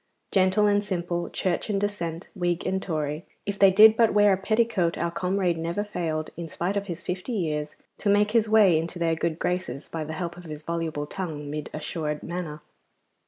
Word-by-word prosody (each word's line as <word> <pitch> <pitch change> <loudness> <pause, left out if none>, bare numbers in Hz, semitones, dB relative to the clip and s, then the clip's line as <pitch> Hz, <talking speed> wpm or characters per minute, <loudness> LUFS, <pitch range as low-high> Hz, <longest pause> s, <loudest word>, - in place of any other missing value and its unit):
Gentle 190 +2 +4
and 205 0 +3
simple, 175 -3 -2
Church 185 +3 -1
and 200 -2 +1
Dissent, 175 -4 -3
Whig 175 -3 -1
and 190 0 0
Tory, 155 -3 -2 0.2
if 200 0 -3
they 195 - +8
did 215 +3 +8
but 225 -2 +3
wear 205 -1 +6
a - - +1
petticoat 215 -4 +1
our 170 0 -1
comrade 180 -1 0
never 170 +5 -1
failed, 160 -6 -3
in 170 0 -5
spite 180 +5 -2
of 200 0 -2
his 170 -2 -5
fifty 185 +7 -4
years, 150 -6 -2 0.2
to 205 - 0
make 205 +1 +4
his 225 -1 +3
way 205 -7 +6
into 165 +2 -5
their 165 -1 +1
good 160 0 -1
graces 180 -6 -2
by 160 -1 -4
the 155 +1 -6
help 170 +1 -4
of 180 - -11
his 155 -1 -7
voluble 165 -3 -2
tongue 150 -4 -5
mid 150 0 -4
assured 150 -1 -4
manner. 165 -4 -5
175 Hz, 200 wpm, -26 LUFS, 160-200 Hz, 0.2 s, they